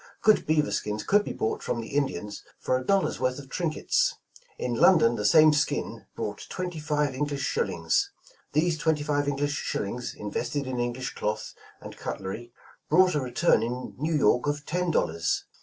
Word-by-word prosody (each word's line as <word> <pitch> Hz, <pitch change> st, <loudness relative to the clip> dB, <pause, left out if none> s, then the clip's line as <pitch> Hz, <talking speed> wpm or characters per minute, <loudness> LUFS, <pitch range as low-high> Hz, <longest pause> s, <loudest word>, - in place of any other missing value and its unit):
Good 215 Hz, -1 st, +4 dB
beaver 150 Hz, -1 st, +2 dB
skins 105 Hz, 0 st, -2 dB
could 205 Hz, +1 st, +3 dB
be -, -, -4 dB
bought 110 Hz, -, -2 dB
from 120 Hz, -, -2 dB
the 115 Hz, -, -6 dB
Indians 105 Hz, -8 st, -2 dB, 0.2 s
for 130 Hz, -, 0 dB
a 130 Hz, -, -1 dB
dollar's 195 Hz, +6 st, +1 dB
worth 130 Hz, 0 st, 0 dB
of 140 Hz, -2 st, -10 dB
trinkets. 180 Hz, -, 0 dB, 0.4 s
In 125 Hz, -, -2 dB
London 120 Hz, -2 st, +5 dB
the 105 Hz, -, -3 dB
same 155 Hz, +2 st, +7 dB
skin 145 Hz, -, -1 dB
brought -, -, -5 dB
twenty 180 Hz, -3 st, -4 dB
five 150 Hz, -2 st, 0 dB
English 145 Hz, +1 st, -2 dB
shillings. 435 Hz, -3 st, 0 dB, 0.4 s
These 160 Hz, +1 st, +2 dB
twenty 160 Hz, -2 st, +1 dB
five 145 Hz, -1 st, 0 dB
English 145 Hz, 0 st, 0 dB
shillings 120 Hz, -3 st, -3 dB
invested 120 Hz, +7 st, -3 dB
in 130 Hz, -1 st, -3 dB
English 125 Hz, +3 st, -2 dB
cloth 110 Hz, -4 st, -3 dB, 0.3 s
and -, -, -10 dB
cutlery, 110 Hz, +5 st, -5 dB, 0.4 s
brought 180 Hz, +4 st, +5 dB
a 150 Hz, -, +1 dB
return 130 Hz, +1 st, +2 dB
in 125 Hz, +2 st, -4 dB
New 155 Hz, +2 st, 0 dB
York 125 Hz, -1 st, +3 dB
of 145 Hz, 0 st, -2 dB
ten 180 Hz, +1 st, -1 dB
dol 160 Hz, -, +3 dB
lars. 80 Hz, 0 st, -1 dB
145 Hz, 175 wpm, -27 LUFS, 120-160 Hz, 0.4 s, same